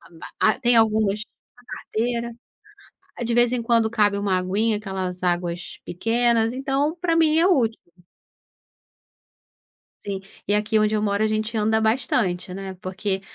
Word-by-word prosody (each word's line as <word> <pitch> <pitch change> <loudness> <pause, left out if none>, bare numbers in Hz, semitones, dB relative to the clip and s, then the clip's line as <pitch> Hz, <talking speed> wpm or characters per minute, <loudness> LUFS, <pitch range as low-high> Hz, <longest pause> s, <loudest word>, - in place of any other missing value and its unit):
Ah, - - -18
ma 165 - -11 0.3
ah - - -8
tem 240 -1 +3
algumas 215 -2 +3 0.4
a 245 - -19
carteira. 235 +1 -3 0.9
De 235 - -1
vez 240 0 +4
em 245 -1 -1
quando 230 -1 +2
cabe 205 -3 +2
uma 200 -2 0
aguinha, 205 +4 0
aquelas 190 -3 -5
águas 175 -1 -2
pequenas, 230 +4 +1
então, 270 +4 -1
pra 340 -3 +1
mim 320 -1 +4
é 340 - +4
útil 240 - +2 2.3
Sim, 200 -1 -3 0.3
e 205 - 0
aqui 210 +1 +1
onde 215 0 +2
eu 210 - +1
moro, 205 0 +1
a - - +3
gente 215 +1 -2
anda 220 +1 +2
bastante, 215 -5 0
né, 195 0 -6
porque 190 +1 -3
215 Hz, 155 wpm, -23 LUFS, 195-235 Hz, 2.3 s, vez